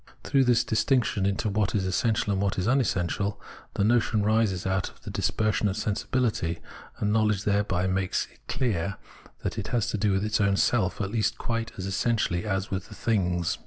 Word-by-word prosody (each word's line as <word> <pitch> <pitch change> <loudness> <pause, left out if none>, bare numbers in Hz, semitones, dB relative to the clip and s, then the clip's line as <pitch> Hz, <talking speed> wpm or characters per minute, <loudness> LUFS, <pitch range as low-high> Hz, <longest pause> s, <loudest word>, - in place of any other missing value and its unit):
Through 135 -1 +3
this 120 -1 +4
distinction 110 -3 +1
into 100 +2 -1
what 105 0 0
is 95 -3 +1
essential 105 +2 +1
and 95 - 0
what 100 -1 0
is 95 - 0
unessential, 100 -6 0 0.4
the - - +1
notion 110 -1 +2
rises 105 -4 +1
out 95 -1 0
of - - -21
the - - -6
dispersion 105 0 +1
of 95 - -2
sensibility, 110 -5 -1 0.4
and 105 0 0
knowledge 110 -2 +2
thereby 100 -3 +1
makes 95 0 0
it - - -25
clear 100 -8 -1 0.5
that - - -2
it - - -4
has 120 -3 0
to 105 - -2
do 105 0 +2
with 95 +2 +1
its 110 0 +1
own 100 -1 +3
self 100 -6 +1
at 100 -1 -2
least 110 0 0
quite 115 -1 -2
as 95 - -4
essentially 95 -2 0
as 95 -1 -1
with 95 -1 -2
things. 90 -5 0
105 Hz, 190 wpm, -27 LUFS, 95-115 Hz, 0.5 s, this